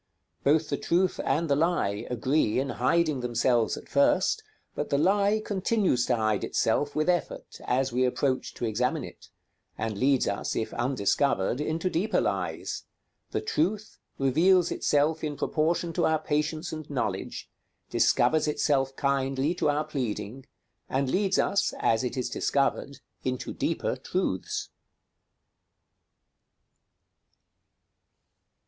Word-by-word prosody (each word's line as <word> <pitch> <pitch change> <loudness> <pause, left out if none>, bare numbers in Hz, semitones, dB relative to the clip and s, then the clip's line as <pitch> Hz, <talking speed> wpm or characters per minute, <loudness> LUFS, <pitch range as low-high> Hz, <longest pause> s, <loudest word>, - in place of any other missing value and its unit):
Both 155 +2 +3
the 140 - 0
truth 180 +2 +1
and 160 +5 +1
the 140 - +3
lie 150 - 0
agree 125 0 +1
in 135 +1 -1
hiding 165 -5 +2
themselves 120 -1 +1
at - - -10
first, 365 +11 +2 0.3
but 145 - -3
the 140 - +2
lie 200 +6 +3
continues 190 - +1
to 125 - +3
hide 110 -3 0
itself 145 0 0
with 155 +2 +1
effort, 175 -1 -2
as 130 0 0
we 125 +1 +2
approach 130 +1 0
to - - -3
examine 125 +7 0
it; 95 -5 -11 0.5
and 110 -1 -2
leads 135 -1 +3
us, 100 - -2
if 110 - -2
undiscovered, 125 0 +1
into 160 +4 -1
deeper 185 +5 +1
lies; - - -2 0.4
the - - -2
truth 210 - -1 0.2
reveals 165 +7 +3
itself 150 +2 +1
in 150 -2 -3
proportion 165 +2 0
to - - +2
our 160 0 +3
patience 155 +2 -2
and 155 -1 -7
knowledge, 140 -4 -3 0.4
discovers 155 -1 +3
itself 140 -3 +1
kindly 135 +2 0
to 155 - 0
our 145 +1 +1
pleading, 130 -4 -4 0.4
and 135 0 0
leads 195 0 +1
us, 200 - +1
as 115 +2 +1
it 125 - -3
is 125 - -1
discovered, 140 +2 -1 0.2
into 130 -1 -3
deeper - - -1
truths. - - -2
145 Hz, 130 wpm, -27 LUFS, 130-165 Hz, 0.5 s, Both